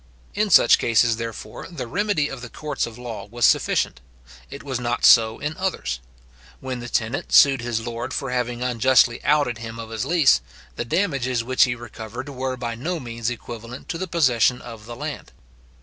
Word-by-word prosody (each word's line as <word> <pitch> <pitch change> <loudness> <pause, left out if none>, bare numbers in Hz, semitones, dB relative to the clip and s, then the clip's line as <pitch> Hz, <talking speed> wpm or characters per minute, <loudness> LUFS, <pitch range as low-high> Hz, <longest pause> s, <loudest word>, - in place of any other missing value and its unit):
In 210 0 0
such 140 -9 +6
cases, 115 0 +3
therefore, 115 -2 -7
the 170 -7 -6
remedy 185 - 0
of 135 -3 -7
the 125 - -8
courts 150 -1 -3
of 115 -1 -10
law 120 -4 -7
was 120 +3 0
sufficient. - - +2 0.5
It - - -9
was 130 -3 -3
not 120 0 0
so 110 -1 +6
in 150 +2 -4
others. 65 - -2 0.6
When 130 -1 -5
the 120 0 -7
tenant 115 +4 -2
sued 135 -3 +6
his 120 -2 -2
lord 120 -1 -4
for 135 -3 -3
having 125 -1 -2
unjustly 125 0 +3
outed 140 -6 +2
him 115 0 -7
of 115 -1 -8
his 110 -1 -2
lease, 160 - +4 0.3
the 120 - -3
damages 135 -7 0
which 130 +3 +4
he 120 -1 -2
recovered 120 +2 -8
were 130 -1 -3
by 120 -2 -4
no 160 +9 -3
means 115 -2 -4
equivalent 120 +1 -8
to 165 - -3
the 185 - -3
possession 130 -8 +2
of 115 -2 -11
the 120 - -7
land. 145 0 -6
120 Hz, 185 wpm, -23 LUFS, 115-140 Hz, 0.6 s, such